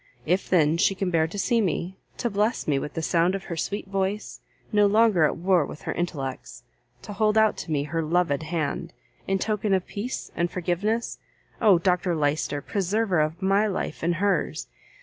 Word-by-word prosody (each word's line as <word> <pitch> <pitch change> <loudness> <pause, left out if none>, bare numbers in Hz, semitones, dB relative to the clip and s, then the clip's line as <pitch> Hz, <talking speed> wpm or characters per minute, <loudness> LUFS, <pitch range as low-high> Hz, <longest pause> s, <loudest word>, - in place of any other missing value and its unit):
If 180 +5 0
then 160 -3 +3
she 195 +2 +2
can 190 -1 -2
bear 160 -2 +2
to 185 - -8
see 235 +3 +2
me, 185 -1 -2 0.2
to 235 - -1
bless 210 +4 0
me 140 -3 +2
with 145 +1 -6
the 165 - -2
sound 175 +3 +2
of 195 - -5
her 170 - -5
sweet 200 +6 -3
voice, 195 +2 -3 0.3
no 210 -1 +4
longer 210 -5 +4
at - - 0
war 180 -1 +3
with 145 - -9
her - - -3
intellects, 135 -8 -4 0.4
to 205 - -7
hold 215 +1 +2
out 220 -1 +4
to 165 - -6
me 145 -2 +1
her 160 +3 -2
loved 160 -2 +1
hand, 155 -2 -3 0.3
in 195 - +1
token 210 0 0
of 185 - -1
peace 225 +6 -5
and 170 +1 0
forgiveness. 185 +7 -2 0.4
Oh, 205 -5 +6
Dr 180 0 +1
Lyster! 145 -1 -1
preserver 200 -1 0
of 155 +5 -1
my 200 +3 +3
life 195 -5 -4
in 170 +1 +2
hers! 185 -2 0
180 Hz, 190 wpm, -25 LUFS, 160-205 Hz, 0.4 s, Oh